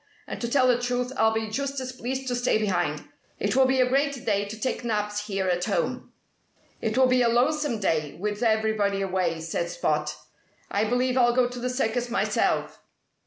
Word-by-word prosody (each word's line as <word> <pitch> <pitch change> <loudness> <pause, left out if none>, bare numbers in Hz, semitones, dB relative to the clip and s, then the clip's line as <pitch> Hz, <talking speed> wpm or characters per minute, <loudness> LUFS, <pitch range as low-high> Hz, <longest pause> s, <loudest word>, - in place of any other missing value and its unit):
And - - -7
to 235 - -2
tell 255 0 +3
the 245 -1 +3
truth, 245 +1 -1
I'll 220 -3 +3
be 220 0 -1
just 275 +5 -3
as 255 -1 -5
pleased 260 +1 -4
to 245 - 0
stay 245 -2 +2
behind. 175 -8 -1 0.3
It 205 - -1
will 265 0 +5
be 260 0 +2
a 255 - +4
great 275 0 0
day 205 -2 +1
to 215 +2 -8
take 255 +1 -2
naps 210 -2 -2
here 195 -2 -1
at 180 0 0
home." - - -2 0.7
"It 220 +2 -1
will 260 - +6
be 255 0 +3
a 235 - +4
lonesome 260 +1 +1
day, 155 -7 -1
with 210 +2 -3
everybody 220 -3 +1
away," 180 -4 -1
said 165 +1 -2
Spot. 150 -3 -1 0.6
"I 205 +2 +1
believe 250 +3 +1
I'll 240 -1 +4
go 250 -1 +4
to 245 0 -7
the 250 +1 -2
circus 245 -1 -1
myself." 240 - 0
230 Hz, 200 wpm, -26 LUFS, 205-255 Hz, 0.7 s, will